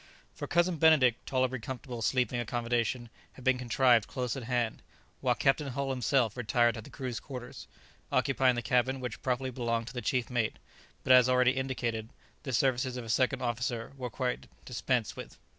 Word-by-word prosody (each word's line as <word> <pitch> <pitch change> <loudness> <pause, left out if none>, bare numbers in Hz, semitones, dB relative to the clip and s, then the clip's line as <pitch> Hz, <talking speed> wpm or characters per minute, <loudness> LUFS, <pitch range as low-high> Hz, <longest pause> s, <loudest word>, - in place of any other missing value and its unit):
For - - -6
Cousin 175 0 +2
Benedict 145 -7 +4
tolerably 130 -1 0
comfortable 125 -1 -6
sleeping 125 +2 +1
accommodation 120 0 -1 0.2
had 130 - -13
been 130 0 +3
contrived 120 -2 +3
close 125 -3 -3
at 135 - -5
hand, 120 -2 -1 0.4
while - - +1
Captain 140 +2 +2
Hull 135 +1 -2
himself 125 -3 +1
retired 120 0 +2
to 110 - -6
the - - -13
crew's 125 -4 -5
quarter, 125 -3 -8 0.6
occupying 130 -2 +3
the 120 - -3
cabin 125 +3 +1
which 125 -3 -5
properly 130 0 -1
belonged 115 -2 -1
to - - -11
the 125 - -4
chief 125 +2 -1
mate, 115 -3 0 0.5
but 130 - +5
as 125 0 +7
already 125 0 +4
indicated, 120 -4 -2 0.3
the 135 - -5
services 125 0 +1
of 120 - -5
a - - -9
second 130 +2 +1
officer 120 0 -2
were 125 -2 -5
quite 125 +3 -3 0.2
dispensed 125 -2 -1
with. - - -9
125 Hz, 175 wpm, -30 LUFS, 120-130 Hz, 0.6 s, as